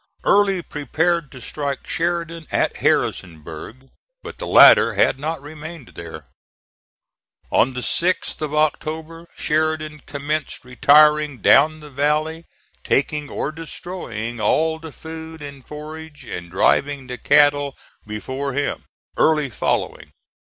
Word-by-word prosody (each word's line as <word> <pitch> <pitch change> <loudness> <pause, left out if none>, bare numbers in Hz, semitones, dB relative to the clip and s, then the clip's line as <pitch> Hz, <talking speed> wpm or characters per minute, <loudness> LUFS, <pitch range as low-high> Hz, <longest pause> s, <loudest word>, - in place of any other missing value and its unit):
Early 195 -3 +3
prepared 160 +2 -1
to 130 - -10
strike 140 +2 -4
Sheridan 170 -1 -2
at - - 0
Harrisonburg; 85 - -2 0.3
but - - -9
the - - -5
latter - - +7
had - - +2
not 160 +3 -3
remained 155 -1 -9
there. 80 -3 -9 1.3
On 130 +2 +3
the 125 - -3
6th 175 +6 0
of 155 -2 -2
October 160 +2 -2
Sheridan 155 -1 -1
commenced 145 0 -4
retiring 150 +2 +4
down 155 +5 +4
the 150 -1 -12
valley, 155 +4 0 0.4
taking 145 +1 0
or 145 - -3
destroying 135 - -6
all 160 +9 +1
the 160 -1 -9
food 160 0 -9
and 140 -2 -9
forage 155 0 -9
and 85 -1 -7
driving 135 +9 +1
the 125 -1 -7
cattle 145 -1 +3 0.3
before 130 +6 -4
him, 145 +2 -2 0.3
Early 150 -4 +2
following. - - -2
150 Hz, 120 wpm, -21 LUFS, 135-160 Hz, 1.3 s, latter